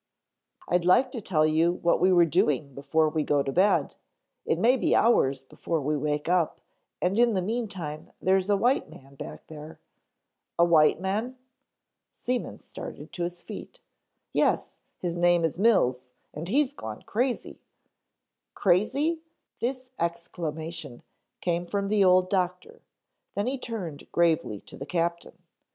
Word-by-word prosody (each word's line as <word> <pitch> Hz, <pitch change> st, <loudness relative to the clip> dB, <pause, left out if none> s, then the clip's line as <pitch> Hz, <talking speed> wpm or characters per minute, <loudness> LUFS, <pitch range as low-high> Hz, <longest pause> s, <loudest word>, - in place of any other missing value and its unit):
"I'd 175 Hz, 0 st, +2 dB
like 245 Hz, +9 st, +4 dB
to 235 Hz, -, -5 dB
tell 155 Hz, -6 st, +2 dB
you 160 Hz, +2 st, +3 dB
what 170 Hz, -1 st, +1 dB
we 185 Hz, +2 st, +4 dB
were 175 Hz, -2 st, +6 dB
doing 145 Hz, -2 st, +1 dB
before 150 Hz, +4 st, +1 dB
we 155 Hz, 0 st, 0 dB
go 145 Hz, -1 st, +2 dB
to 135 Hz, -, -2 dB
bed. 190 Hz, +7 st, +2 dB, 0.5 s
It -, -, +2 dB
may 245 Hz, +3 st, +4 dB
be 255 Hz, -, +2 dB
hours 135 Hz, -, +3 dB
before 160 Hz, +4 st, -3 dB
we 150 Hz, +1 st, -1 dB
wake 150 Hz, +1 st, -2 dB
up 175 Hz, -2 st, +1 dB, 0.4 s
and 190 Hz, +5 st, +1 dB
in 240 Hz, -3 st, +4 dB
the 185 Hz, -, +1 dB
meantime 190 Hz, -9 st, -4 dB
there's 190 Hz, +1 st, +2 dB
a 205 Hz, -, +4 dB
white 245 Hz, +6 st, +1 dB
man 135 Hz, +1 st, -15 dB
back 75 Hz, -, -9 dB
there 155 Hz, 0 st, -10 dB, 0.4 s
" -, -, -56 dB
"A 170 Hz, -, +5 dB
white 160 Hz, -2 st, +4 dB
man?" 215 Hz, +7 st, -2 dB, 0.8 s
Seaman 250 Hz, 0 st, -3 dB
started -, -, -10 dB
to 175 Hz, -, -5 dB
his 175 Hz, 0 st, -4 dB
feet. -, -, -9 dB, 0.5 s
"Yes, -, -, +1 dB, 0.2 s
his 175 Hz, -1 st, -3 dB
name 175 Hz, -1 st, +4 dB
is 165 Hz, +2 st, -3 dB
Mills 130 Hz, -, +3 dB, 0.3 s
and 155 Hz, +3 st, -6 dB
he's 280 Hz, +4 st, +2 dB
gone 110 Hz, -, -8 dB
crazy 245 Hz, +3 st, -2 dB, 0.5 s
" -, -, -58 dB
"Crazy?" 280 Hz, -, +2 dB, 0.4 s
This 255 Hz, +1 st, -3 dB
exclamation 165 Hz, -4 st, -4 dB, 0.4 s
came 175 Hz, 0 st, -1 dB
from 200 Hz, +1 st, -2 dB
the 210 Hz, -1 st, +3 dB
old 185 Hz, 0 st, +5 dB
doctor, 185 Hz, -, -2 dB, 0.5 s
then 205 Hz, -, 0 dB
he 265 Hz, +2 st, -2 dB
turned 190 Hz, -, -6 dB
gravely 165 Hz, -11 st, +1 dB
to -, -, -12 dB
the 140 Hz, -, -7 dB
captain. 170 Hz, +1 st, -2 dB
175 Hz, 155 wpm, -27 LUFS, 155-205 Hz, 0.8 s, were